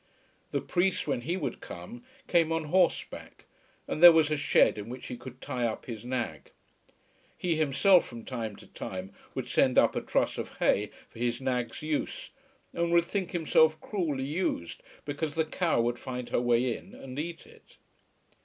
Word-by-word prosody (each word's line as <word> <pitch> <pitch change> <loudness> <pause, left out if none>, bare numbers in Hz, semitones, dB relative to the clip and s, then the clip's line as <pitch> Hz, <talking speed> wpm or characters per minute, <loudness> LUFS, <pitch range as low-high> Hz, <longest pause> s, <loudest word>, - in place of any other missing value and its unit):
The - - -1
priest, 180 +1 +1
when 135 -5 -1
he 170 +9 -2
would 160 - -4
come, 240 +1 -9 0.2
came 165 -2 +3
on 165 0 0
horseback, 185 -2 0 0.4
and 155 - -3
there 175 0 +12
was 160 -2 +3
a - - +3
shed 145 -6 +3
in 105 +2 -7
which 125 +1 -7
he 125 - -5
could 125 +1 -10
tie 125 -1 -3
up 110 - -5
his 115 -4 -7
nag. 125 -1 -4 0.9
He 175 -2 0
himself 160 +5 +4
from 115 -2 -9
time 115 -5 -4
to - - -14
time 95 0 -7 0.2
would - - -3
send - - +2
up - - +5
a - - 0
truss - - 0
of - - -6
hay - - +2 0.2
for - - -13
his 120 0 0
nag's 125 -1 -2
use, 155 -1 -3 0.4
and 170 0 0
would 170 0 +4
think 190 0 -2
himself 160 -2 +3
cruelly 155 -10 -2
used 145 - -2 0.2
because 145 +1 -3
the 160 -1 +2
cow 165 -3 0
would 120 +1 -1
find 125 -2 -5
her - - +1
way 120 0 +2
in 195 - -12
and 135 +1 -7
eat 165 +2 -5
it. - - -19
145 Hz, 180 wpm, -29 LUFS, 120-170 Hz, 0.9 s, there